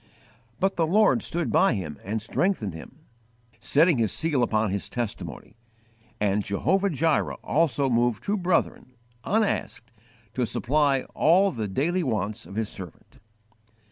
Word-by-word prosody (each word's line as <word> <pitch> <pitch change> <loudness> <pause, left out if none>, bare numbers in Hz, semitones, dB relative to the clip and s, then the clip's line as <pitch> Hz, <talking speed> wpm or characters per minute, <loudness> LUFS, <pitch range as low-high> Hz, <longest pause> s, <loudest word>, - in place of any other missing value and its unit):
But 195 0 0
the 165 -2 +2
Lord 215 +5 +4
stood 170 -3 -2
by 190 -10 +4
him 75 -8 -5
and 110 +3 -3
strengthened 115 - -1
him, 130 - -12 0.6
setting 150 - +3
His 110 -3 +1
seal 155 -5 0
upon 110 -3 +1
his 100 0 -3
testimony; 120 -1 -6 0.6
and 105 0 +1
Jehovah 175 - +1
Jireh 160 -1 +1
also 145 -4 +1
moved 120 -2 +1
two 205 - 0
brethren, 170 -7 -1 0.3
unasked, 200 - -1 0.4
to 125 -1 -1
supply 140 +2 +1
all 190 +5 +4
the 110 -4 -4
daily 160 - 0
wants 110 - -2
of 95 - -10
His 110 -1 -1
servant. 90 -5 -10
130 Hz, 140 wpm, -25 LUFS, 110-170 Hz, 0.6 s, Lord